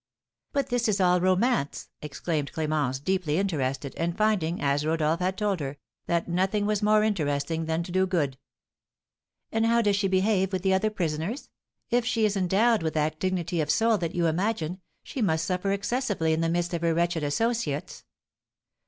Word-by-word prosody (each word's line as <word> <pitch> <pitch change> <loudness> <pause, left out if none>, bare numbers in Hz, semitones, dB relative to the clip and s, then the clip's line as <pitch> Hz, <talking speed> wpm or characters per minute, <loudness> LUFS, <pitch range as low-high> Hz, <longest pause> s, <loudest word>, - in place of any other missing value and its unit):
"But 280 -1 -1
this 245 -1 +1
is 205 -2 +1
all 180 -1 +4
a - - -2
romance!" 185 - +1
exclaimed 150 0 -3
Clémence, 150 -5 -1
deeply 180 -4 0
interested, 140 -8 -1
and 170 +1 -2
finding, 200 -6 +1
as 140 +1 +1
Rodolph 160 +1 +1
had 185 +1 -1
told 205 -4 0
her, 140 -1 -5 0.3
that 170 -1 0
nothing 190 +4 0
was 210 0 0
more 210 0 +4
interesting 160 -5 -1
than 160 +1 -1
to 175 - -8
do 185 +1 +2
good. 145 -8 -1 1.1
"And 225 0 +1
how 235 0 +3
does 205 -1 +3
she 195 0 +1
behave 190 0 +1
with 185 -1 -1
the 190 -1 +3
other 190 +3 +2
prisoners? 175 - -3 0.4
If 245 0 +3
she 230 -2 +1
is 205 -1 +1
endowed 200 +4 +3
with 160 -1 -2
that 155 0 0
dignity 180 -2 -1
of 150 - -3
soul 225 +4 +3
that 170 0 -3
you 175 -1 +1
imagine, 180 +1 -1 0.2
she 265 - -5
must 160 -6 +1
suffer 185 +3 -1
excessively 200 -5 0
in 160 - 0
the 165 - +1
midst 175 +1 -1
of 170 - -2
her 165 -1 +1
wretched 170 -1 +1
associates." 155 -1 -1
180 Hz, 185 wpm, -27 LUFS, 160-205 Hz, 1.1 s, all